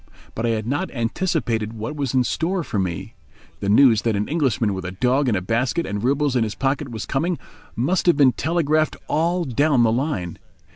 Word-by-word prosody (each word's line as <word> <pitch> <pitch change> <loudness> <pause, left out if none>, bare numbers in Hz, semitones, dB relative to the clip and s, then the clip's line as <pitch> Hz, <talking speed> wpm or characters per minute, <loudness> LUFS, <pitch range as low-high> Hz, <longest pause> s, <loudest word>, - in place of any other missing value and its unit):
But 115 +1 -2
I - - +1
had 110 -2 -1
not 145 +10 -1
anticipated 115 - -1
what 115 +6 -5
was 140 -3 -2
in 130 - +4
store 170 +7 -1
for 105 - -3
me. 90 -3 -3 0.5
The 100 - -2
news 110 0 +6
that 115 -1 0
an 105 +1 -1
Englishman 130 -9 0
with 95 -1 -5
a 90 0 -5
dog 125 +6 +1
in 110 - +1
a 90 - -1
basket 125 - 0
and 105 +1 -4
roubles 140 +1 +1
in 120 - +3
his 105 -2 -3
pocket 135 +3 -1
was 110 -3 -5
coming 165 +5 -1 0.4
must 170 +11 0
have 175 - +5
been 140 -3 +6
telegraphed 155 -1 0
all 170 +3 +1
down 140 -1 +2
the 115 - +3
line. 115 - -2
130 Hz, 205 wpm, -22 LUFS, 110-150 Hz, 0.5 s, news